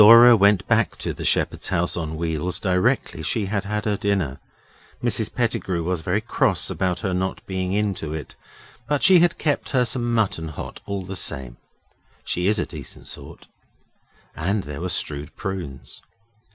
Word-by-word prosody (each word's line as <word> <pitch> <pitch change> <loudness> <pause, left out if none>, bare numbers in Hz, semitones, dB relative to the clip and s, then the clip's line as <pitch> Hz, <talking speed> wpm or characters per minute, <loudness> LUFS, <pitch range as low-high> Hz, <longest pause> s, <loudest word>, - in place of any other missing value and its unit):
Dora 115 +3 +10
went 100 -2 +4
back - - +2
to - - -3
the - - -7
shepherd's - - +1
house 90 -1 0
on 80 -2 -3
wheels 85 +2 -1
directly 100 +8 +1
she 110 -4 0
had 100 +1 -2
had 105 +1 -2
her 105 -2 +1
dinner. 95 -11 0 0.6
Mrs - - +1
Pettigrew 85 -3 -1
was 90 0 -1
very 90 +6 0
cross 115 - +1
about 90 -2 -1
her 95 -4 -1
not 95 +1 -2
being 95 -1 -2
in 105 0 +1
to 80 -4 -6
it, 80 -2 -6 0.5
but 145 0 0
she 190 -3 +8
had 175 0 +3
kept 150 -2 0
her 125 -2 +3
some 120 -1 -1
mutton 105 -8 +1
hot 75 - -7
all 100 -1 -3
the 95 +1 -6
same. 65 -8 -4 0.7
She 90 +1 0
is 105 +1 +3
a - - 0
decent - - -9
sort. - - -10 0.9
And 95 +5 0
there 75 +1 -6
were 90 - -2
stewed 75 -3 -3
prunes. 90 -9 -5
95 Hz, 175 wpm, -23 LUFS, 85-105 Hz, 0.9 s, Dora